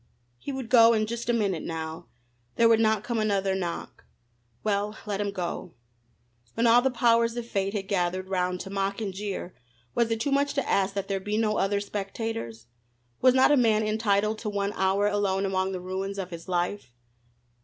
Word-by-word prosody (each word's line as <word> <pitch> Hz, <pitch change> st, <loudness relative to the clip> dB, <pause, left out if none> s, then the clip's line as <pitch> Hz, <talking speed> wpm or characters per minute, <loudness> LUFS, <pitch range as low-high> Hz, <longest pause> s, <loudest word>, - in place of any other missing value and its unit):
He 280 Hz, -, -5 dB
would 265 Hz, -4 st, -5 dB
go 230 Hz, -2 st, +7 dB
in 215 Hz, -1 st, +1 dB
just 235 Hz, +2 st, -5 dB
a -, -, +6 dB
minute 200 Hz, -8 st, 0 dB
now. 160 Hz, -1 st, -5 dB, 0.5 s
There 230 Hz, -, +5 dB
would 225 Hz, -1 st, +5 dB
not 220 Hz, -2 st, +2 dB
come 235 Hz, -2 st, -2 dB
another 200 Hz, -3 st, +1 dB
knock. 175 Hz, -3 st, -4 dB, 0.6 s
Well, 210 Hz, 0 st, -1 dB
let 205 Hz, -1 st, -2 dB
him 205 Hz, -, -1 dB
go. 180 Hz, -2 st, -5 dB, 0.8 s
When 230 Hz, -, +1 dB
all 235 Hz, +1 st, +6 dB
the 265 Hz, -, +2 dB
powers 235 Hz, -1 st, +2 dB
of 240 Hz, -, -3 dB
fate 195 Hz, -3 st, -1 dB
had 195 Hz, -2 st, -3 dB
gathered 185 Hz, -1 st, -1 dB
round 180 Hz, -1 st, -1 dB
to 195 Hz, -, -8 dB
mock 195 Hz, +1 st, -1 dB
and 205 Hz, -4 st, -3 dB
jeer 195 Hz, -2 st, -5 dB, 0.4 s
was 235 Hz, -1 st, +1 dB
it 225 Hz, -1 st, -1 dB
too 275 Hz, +5 st, -1 dB
much 280 Hz, +1 st, +1 dB
to 280 Hz, -, -1 dB
ask 195 Hz, 0 st, +1 dB
that 200 Hz, -1 st, -2 dB
there 195 Hz, -1 st, -1 dB
be 210 Hz, +2 st, -2 dB
no 215 Hz, -1 st, +1 dB
other 200 Hz, +1 st, +1 dB
spectators? 200 Hz, -, -5 dB, 0.6 s
Was 255 Hz, 0 st, +5 dB
not 260 Hz, +2 st, +5 dB
a -, -, +6 dB
man 220 Hz, -3 st, +3 dB
entitled 215 Hz, 0 st, +1 dB
to 215 Hz, -, -3 dB
one 200 Hz, 0 st, -2 dB
hour 190 Hz, +2 st, +1 dB
alone 200 Hz, -1 st, +1 dB
among 190 Hz, 0 st, 0 dB
the 185 Hz, -, -4 dB
ruins 190 Hz, +2 st, -4 dB
of 185 Hz, -2 st, -5 dB
his 170 Hz, +1 st, -8 dB
life? 175 Hz, -3 st, -2 dB
205 Hz, 195 wpm, -27 LUFS, 190-225 Hz, 0.8 s, go